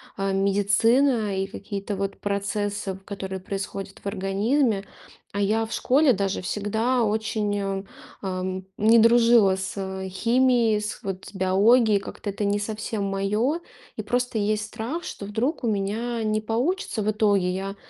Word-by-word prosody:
а, 195 0 -1
медицина 205 +4 +2
и 195 - -1
какие-то 200 0 -5
вот 195 0 -3
процессы, 205 0 -2
в 190 - -10
которые 190 -1 -5
происходят 195 +1 -5
в - - -25
организме. 200 +3 0 0.5
А 200 - -2
я 220 +3 +2
в 225 - -11
школе 275 +1 +4
даже 195 -1 -1
всегда 220 +6 0
очень, 215 -1 0
э, 195 0 -2 0.4
ам, 185 -1 -3
не 225 +2 +5
дружила 230 -4 +5
с 190 0 -4
химией, 235 +2 +3
с, 210 - -5
вот, 190 -1 -5
с - - -11
биологией. 205 +3 +4
Как-то 205 - -7
это 205 +1 -3
не 205 0 +1
совсем 215 0 -3
мое. 210 - 0 0.4
И - - -3
просто 245 -1 -1
есть 215 +1 0
страх, 245 +11 -5
что 200 - -7
вдруг 240 +9 -2
у 235 - +1
меня 220 +3 -1
не 215 0 0
получится 240 - -1
в 210 - 0
итоге. 205 -4 +2
Я 195 +2 -4
205 Hz, 155 wpm, -25 LUFS, 195-230 Hz, 0.5 s, не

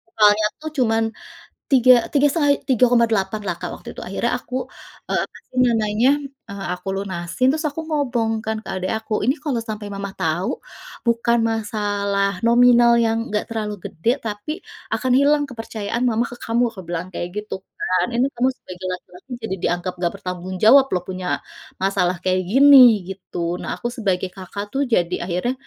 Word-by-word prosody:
Soalnya 210 0 +5 0.2
tuh 315 - -4
cuman, 225 -2 +2 0.7
tiga 255 -1 +7 0.2
tiga 290 0 +4
setengah 290 -3 +2 0.2
Rp3.800.000 230 -5 +3
lah - - -1
Kak - - -4
waktu - - -11
itu - - -8
akhirnya - - -1
aku, 255 - -8 0.6
eee, - - +2
apa - - -17
sih 255 - -10
namanya, 225 +1 +2 0.4
eee, 200 -1 -6
aku 180 +2 -10
lunasin 190 +4 -1
terus 310 +2 -2
aku 305 +3 -5
ngomong 245 -7 0
kan 220 0 -1
ke - - -9
adik 185 0 -2
aku, 220 0 -6
"Ini 260 +4 +3
kalau 275 -6 -1
sampai 210 -1 -5
mama 200 0 -5
tahu, 165 +4 -1 0.6
bukan 235 0 +2
masalah 205 -2 -1
nominal 240 0 +6
yang 225 0 +1
enggak 210 - -1
terlalu 215 -2 -3
gede 165 +8 -2 0.2
tapi 210 +6 -4 0.4
akan 255 -1 0
hilang 290 +1 +4
kepercayaan 225 -1 -4
mama 230 0 +1
ke 245 - -9
kamu," 230 +2 +1
aku 195 -4 -9
bilang 175 +1 -3
kayak 175 0 -4
gitu 210 0 -4 0.2
kan, 185 - +1
"Ini 245 +2 +3
kamu 245 +2 +2
sebagai 185 0 -10
laki-laki 265 - -12
jadi 190 -3 -2
dianggap 175 +1 -1
enggak 175 -1 0
bertanggung 180 0 -5
jawab 265 +5 +8
loh 180 - 0
punya, 185 -1 -5 0.5
masalah 190 -2 +1
kayak 185 0 +1
gini," 280 +3 +8 0.3
gitu 175 -2 -4
nah - - -3
aku 210 +7 -4
sebagai 190 -6 -1
Kakak 200 +2 -7
tuh 275 +3 0
jadi 180 -6 +1
akhirnya, 180 +8 -1
215 Hz, 170 wpm, -21 LUFS, 185-245 Hz, 0.7 s, jawab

